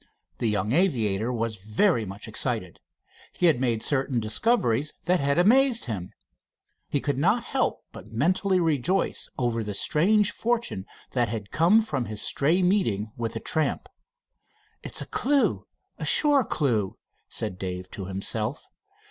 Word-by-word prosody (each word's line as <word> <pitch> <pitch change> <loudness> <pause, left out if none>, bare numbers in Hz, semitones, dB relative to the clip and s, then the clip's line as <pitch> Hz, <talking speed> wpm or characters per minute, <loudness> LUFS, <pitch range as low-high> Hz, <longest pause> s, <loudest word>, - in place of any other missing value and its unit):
The 115 - +1
young 105 +1 -1
aviator 120 - +1
was 115 -2 -2
very 110 - +1
much 100 +3 -8
excited. 110 -5 -2 0.5
He 180 - 0
had 150 -7 +4
made 115 -3 0
certain 135 -2 0
discoveries 130 - +1
that 180 0 +3
had 140 +1 +1
amazed 240 +6 +4
him. 100 -7 -5 0.8
He 145 - 0
could 140 -1 -1
not 210 +10 +2
help 260 +1 -1
but - - -11
mentally 185 - +1
rejoice 165 +3 0
over 120 -2 0
the 105 -1 -4
strange 205 - +3
fortune 230 - -2 0.2
that 120 -3 +1
had 105 -2 -5
come 185 +8 +4
from 135 - -2
his 105 -1 -6
stray 165 - +1
meeting 115 - +1
with 115 -1 -3
the - - -4
tramp. 160 -6 -1 0.9
"It's - - -3
a - - -10
clew 280 +1 +1 0.3
a - - -3
sure 290 -3 +4
clew," 115 - -1 0.3
said 95 -4 -3
Dave 90 -1 -5
to 95 - -6
himself. 105 +7 -3
130 Hz, 150 wpm, -26 LUFS, -, 0.9 s, had